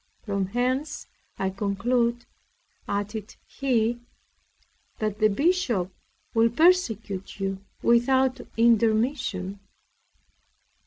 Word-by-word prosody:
From 200 -3 -1
whence 255 +7 -1 0.3
I 190 0 -1
conclude, 235 +5 0 0.6
added 205 +1 -4
he, 240 -4 0 1.0
that 215 -1 -2
the 215 - +5
Bishop 235 - +1 0.4
will 230 0 +4
persecute 225 - +1
you 195 0 -3 0.2
without 255 +2 +3 0.2
intermission. 225 -3 +2
225 Hz, 75 wpm, -26 LUFS, 200-250 Hz, 1.0 s, the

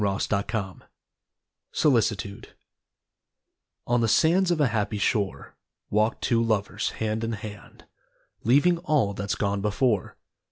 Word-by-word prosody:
r63] 100 -1 0
DAY 100 -1 +1
DREAMS 100 -4 -4 0.9
SOLICITUDE 110 -7 0 1.4
On 120 0 +1
the 115 - +2
sands 175 - +3
of 175 -2 +1
a 145 -4 +3
happy 105 -1 -1
shore, 100 -1 -1 0.4
Walked 110 +2 +1
two 115 -1 +2
lovers, 105 -2 0
hand 110 0 -2
in 115 0 -2
hand, 105 -1 -9 0.6
Leaving 145 +9 +4
all 150 - +1
that's 100 +2 -3
gone 100 -1 -1
before. 105 0 0
110 Hz, 125 wpm, -26 LUFS, 100-120 Hz, 1.4 s, Leaving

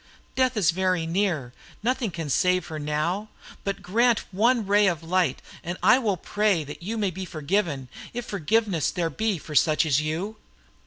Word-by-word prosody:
Death 255 -2 +1
is 175 -6 +4
very 185 -1 0
near, 165 -8 -1 0.3
nothing 250 -1 0
can 165 -3 -5
save 180 +5 +2
her 155 -1 -5
now; 155 +8 -1 0.3
but 200 -1 -3
grant 230 +6 +2
one 225 +4 +2
ray 205 +1 +4
of 170 -3 -1
light, 170 -4 0 0.2
and 175 +2 -4
I 255 - +6
will 210 -7 0
pray 205 -2 +1
that 145 +3 -9
you 215 +6 -4
may 205 -3 0
be 190 +2 -6
forgiven, 155 -4 -1 0.2
if 240 0 -5
forgiveness 200 - +1
there 170 -3 -1
be 215 +4 0
for 155 0 -9
such 155 +1 +4
as 145 -1 +2
you." 170 +8 -3
185 Hz, 175 wpm, -25 LUFS, 160-210 Hz, 0.3 s, I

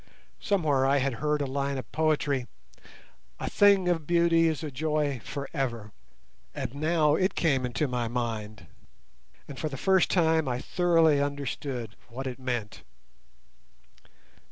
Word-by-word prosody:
Somewhere 155 -9 +1
I 140 +1 +3
had 140 -1 0
heard 150 -1 +1
a - - -1
line 140 +1 -2
of 130 - -7
poetry, 145 -5 0 0.9
A - - -4
thing 200 -3 +4
of 165 -4 0
beauty 170 -1 +4
is 160 -3 -2
a 150 - -4
joy 150 -2 -1
for 140 -1 -5
ever, 120 -7 -3 0.6
and - - -4
now 155 +1 +2
it 185 +5 +1
came 135 -6 +1
into 135 +5 -1
my 125 -2 -2
mind, 110 -3 -4 0.8
and 140 - -9
for 155 - -2
the 135 - -6
first 190 +2 +3
time 160 -4 +2
I 125 -1 -1
thoroughly 165 -3 +3
understood 140 -5 -4
what 130 +3 -6
it 130 0 -5
meant. 120 -5 -4
145 Hz, 145 wpm, -28 LUFS, 130-160 Hz, 0.9 s, thing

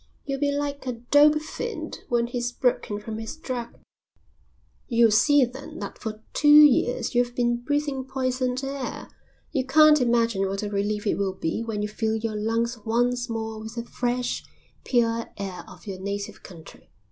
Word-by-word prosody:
You'll 275 -1 -3
be 285 0 +1
like 285 -1 -3
a 250 - -1
dope 290 +6 +4
fiend 470 +8 -5
when 240 -2 +2
he's 245 0 -3
broken 240 -4 0
from 215 +1 -6
his 225 +7 -6
drug. 250 -6 -5 1.1
You'll 230 -2 +4
see 275 +5 +5
then 280 +6 -10
that - - -7
for 215 -1 -6
two 295 - +1
years 295 -5 +6
you've 245 0 +1
been 240 -1 +1
breathing 285 +1 -2
poisoned 255 -1 -1
air. 270 -1 -5 0.4
You 270 -4 0
can't 300 +2 +6
imagine 230 -5 +2
what 195 +2 -3
a 205 - -3
relief 205 +1 -1
it 200 - 0
will 195 -1 -1
be 165 +4 -2
when 215 -2 -3
you - - 0
fill 220 +1 -1
your 220 0 -3
lungs 230 +2 -1
once 245 +2 0
more 220 -1 -4
with 220 +1 -8
the 235 0 -4
fresh, 245 0 -2 0.4
pure 230 -2 +1
air 195 -2 -5
of - - -14
your 195 -3 -6
native 200 +1 -5
country." 165 -4 -14
240 Hz, 170 wpm, -25 LUFS, 220-265 Hz, 1.1 s, years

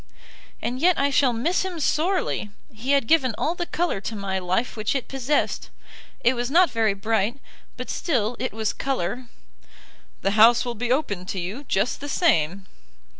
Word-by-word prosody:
"And 250 +2 -2
yet 355 +4 +4
I 280 +1 +2
shall 265 -1 +4
miss 255 +11 0
him 370 -3 -4
sorely. 315 - 0 0.2
He 245 +6 -1
had 275 -4 +3
given 260 -4 +3
all 315 - 0
the 350 0 -4
colour 340 - -1
to 220 - -5
my 195 -2 -2
life 185 +7 -1
which 215 +3 -1
it 270 - -2
possessed. 270 +2 -1 0.5
It 240 +1 +4
was 240 0 -2
not 345 +4 +5
very 220 -3 +1
bright, 220 +4 0 0.4
but - - -5
still 245 - -1
it 255 - -2
was 220 0 -2
colour." 250 -2 -3 1.0
"The 195 - +2
house 225 +4 +6
will 240 - -2
be 240 +2 -3
open 205 - -1
to 190 - -3
you 200 +11 -5
just 205 +2 0
the 285 - -5
same." 195 - +1
240 Hz, 175 wpm, -24 LUFS, 210-285 Hz, 1.0 s, house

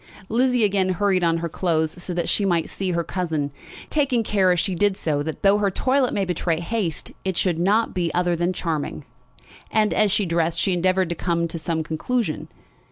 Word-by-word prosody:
Lizzie 250 +1 +2
again 195 -2 +2
hurried 185 0 +1
on 165 -1 +3
her 170 0 -2
clothes 165 0 -1
so 180 - -3
that 170 -1 -1
she 205 - +1
might 175 -4 +1
see 190 -2 -2
her 170 0 0
cousin, 160 -6 -2 0.4
taking 270 -6 +2
care 195 -4 +2
as 180 - +2
she 190 +2 0
did 200 +2 +1
so 150 -3 -1
that 160 +1 -5
though 200 +1 +5
her 200 -1 +2
toilet 260 +6 +1
might 195 -2 -1
betray 170 -2 0
haste, 175 -3 -3
it 190 -2 -2
should 175 -3 +1
not 205 +6 +2
be 175 -3 -1
other 175 -1 +2
than 175 +2 0
charming. 155 -5 -3 0.6
And 215 -1 +2
as 210 -2 +3
she 205 0 +1
dressed 170 -1 0
she 190 - +2
endeavoured 185 0 +1
to 170 - -2
come 170 0 0
to 165 0 -6
some 160 0 -2
conclusion. 160 +4 -2
180 Hz, 205 wpm, -23 LUFS, 165-205 Hz, 0.6 s, though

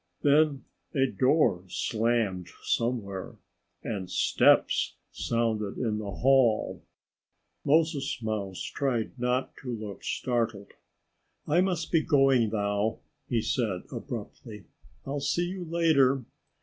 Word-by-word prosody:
Then 145 -1 +3 0.3
a 135 -1 +4
door 130 - +2
slammed 110 -4 -1
somewhere. 110 -6 -2 0.5
And 95 -5 -4
steps - - +3 0.2
sounded 110 -3 -1
in 110 -4 -1
the 105 -2 -5
hall. 120 +2 +2 0.8
Moses 150 -2 +1
Mouse 100 -4 -3
tried 125 -5 -1
not 125 +1 -1
to 130 - -8
look 105 -4 -6
startled. 115 -5 -2 0.8
"I 170 +4 +4
must 185 -3 -1
be 165 - +4
going 135 -7 +3
now," 105 +1 0 0.3
he 115 -3 +1
said 105 -8 -1
abruptly. 105 -4 -7 0.4
"I'll 140 +1 -3
see 170 +5 0
you 185 -1 -5
later." 145 -6 +3
120 Hz, 110 wpm, -28 LUFS, 105-140 Hz, 0.8 s, a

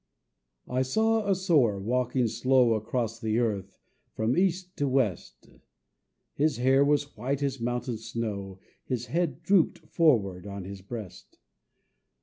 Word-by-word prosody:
I 125 +1 0
saw 220 +10 +1
a 195 - +4
Sower 150 - +2
walking 125 +3 0
slow 120 +1 +3
Across 115 +1 -2
the 110 -1 -1
earth, 100 -5 -1 0.4
from 110 +3 +1
east 185 0 0
to 145 - 0
west; 105 - -1 0.9
His 150 +1 +1
hair 130 +3 +4
was 145 0 +1
white 135 +6 -2
as 135 -3 -2
mountain 120 0 -2
snow, 110 -4 -5 0.3
His 125 -2 -3
head 160 +2 -2
drooped 185 -1 +3
forward 100 - +2
on 100 -1 -6
his 95 +1 -8
breast. 105 -1 -9
125 Hz, 135 wpm, -28 LUFS, 110-145 Hz, 0.9 s, a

